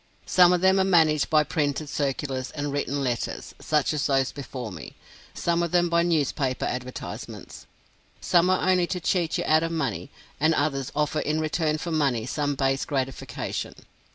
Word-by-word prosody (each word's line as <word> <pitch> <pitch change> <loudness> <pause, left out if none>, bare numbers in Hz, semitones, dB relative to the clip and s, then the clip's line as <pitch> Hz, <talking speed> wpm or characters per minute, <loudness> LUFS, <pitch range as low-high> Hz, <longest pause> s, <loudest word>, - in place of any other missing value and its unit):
Some 180 -1 +6
of 180 -1 +2
them 190 +1 +4
are - - +4
managed 160 -5 +3
by 155 -1 +4
printed 150 -1 -1
circulars 135 -2 -2
and 145 0 -4
written 140 0 -1
letters, 120 -3 -3
such 150 -1 +1
as 150 - 0
those 135 -2 +1
before 125 -4 -7
me; 80 -6 -9 0.4
some 170 0 0
of 170 - 0
them 175 +1 +2
by 170 0 +3
newspaper 145 -6 0
advertisements. 125 0 -6 0.5
Some 175 +1 +3
are 185 0 +1
only 180 -2 +3
to 180 - -3
cheat 170 -1 0
you - - -1
out 155 +1 +4
of 165 0 -2
money, 160 -3 -2 0.3
and 160 +2 +3
others 140 -2 -1
offer 150 +1 0
in 155 +1 -1
return 155 0 0
for 170 +2 -5
money 135 -8 +1
some 145 +2 -1
base 135 0 0
gratification. 135 -2 -4
150 Hz, 175 wpm, -25 LUFS, 135-170 Hz, 0.5 s, Some